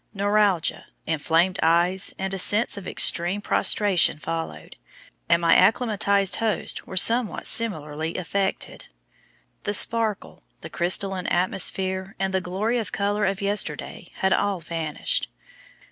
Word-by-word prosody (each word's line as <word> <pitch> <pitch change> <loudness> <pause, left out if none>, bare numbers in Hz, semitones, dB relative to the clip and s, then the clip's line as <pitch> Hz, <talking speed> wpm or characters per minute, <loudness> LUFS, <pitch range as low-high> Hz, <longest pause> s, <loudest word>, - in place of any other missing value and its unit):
Neuralgia, 200 -3 0 0.2
inflamed 165 +4 0
eyes, 175 +3 +2
and 190 0 -4
a 195 - -2
sense 210 +5 +4
of 200 -2 -9
extreme 175 +4 +2
prostration 200 -5 +2
followed, 165 +1 -7 0.5
and 170 - +4
my 165 0 +4
acclimatized 200 -1 +2
hosts 225 -3 -2
were 190 - -8
somewhat 230 +4 +4
similarly 160 -8 -1
affected. 190 +2 -4 0.7
The 205 - -2
sparkle, 225 -3 +1 0.2
the - - -10
crystalline 185 +1 0
atmosphere, 190 +1 -1
and 190 0 -3
the 190 - 0
glory 205 +7 -2
of 225 - -6
color 205 +1 -1
of 195 0 -3
yesterday, 205 +1 -3
had 190 0 0
all 200 -2 -1
vanished. 165 - -4
190 Hz, 125 wpm, -23 LUFS, 175-205 Hz, 0.7 s, sense